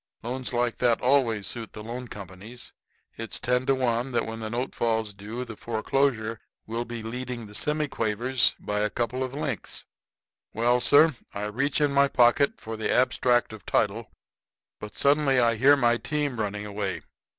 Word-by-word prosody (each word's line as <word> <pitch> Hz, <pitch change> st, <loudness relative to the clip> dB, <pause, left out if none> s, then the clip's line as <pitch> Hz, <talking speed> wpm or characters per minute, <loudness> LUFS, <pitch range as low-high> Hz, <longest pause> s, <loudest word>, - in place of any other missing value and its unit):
Loans 125 Hz, +2 st, -3 dB
like 120 Hz, -1 st, 0 dB
that 120 Hz, -2 st, +2 dB
always 125 Hz, -6 st, +2 dB
suit 115 Hz, +2 st, -5 dB
the 105 Hz, -, -8 dB
loan 120 Hz, +3 st, -6 dB
companies. 100 Hz, +4 st, -10 dB, 0.4 s
It's 115 Hz, -1 st, -4 dB
ten 125 Hz, +1 st, 0 dB
to 135 Hz, -, +4 dB
one 125 Hz, 0 st, 0 dB
that 120 Hz, -, +1 dB
when 115 Hz, 0 st, -6 dB
the 110 Hz, -1 st, -4 dB
note 120 Hz, +3 st, -3 dB
falls 110 Hz, -2 st, 0 dB
due 110 Hz, +6 st, -6 dB
the 115 Hz, -2 st, -8 dB
foreclosure 115 Hz, 0 st, -1 dB, 0.3 s
will 115 Hz, +2 st, -3 dB
be 120 Hz, -1 st, -6 dB
leading 120 Hz, 0 st, -5 dB
the 105 Hz, -, -12 dB
semiquavers 130 Hz, -3 st, +1 dB
by 105 Hz, 0 st, -2 dB
a 105 Hz, 0 st, +1 dB
couple 120 Hz, +4 st, -2 dB
of 130 Hz, +1 st, -5 dB
lengths. 135 Hz, -7 st, -3 dB, 0.7 s
"Well, 120 Hz, +2 st, +3 dB
sir, 145 Hz, +3 st, +5 dB, 0.2 s
I 100 Hz, -, -3 dB
reach 135 Hz, +8 st, -1 dB
in 145 Hz, -2 st, +2 dB
my 140 Hz, 0 st, +5 dB
pocket 125 Hz, +2 st, +3 dB
for 110 Hz, 0 st, -6 dB
the 110 Hz, -, -2 dB
abstract 125 Hz, -2 st, +2 dB
of 110 Hz, -, -10 dB
title; 110 Hz, +3 st, 0 dB, 0.7 s
but 105 Hz, 0 st, -8 dB
I -, -, -12 dB
suddenly 135 Hz, -5 st, +3 dB
hear 140 Hz, +3 st, +7 dB
my 120 Hz, -3 st, +3 dB
team 145 Hz, -3 st, -2 dB
running 105 Hz, -1 st, -2 dB
away. 100 Hz, -5 st, -3 dB
120 Hz, 175 wpm, -26 LUFS, 110-130 Hz, 0.7 s, hear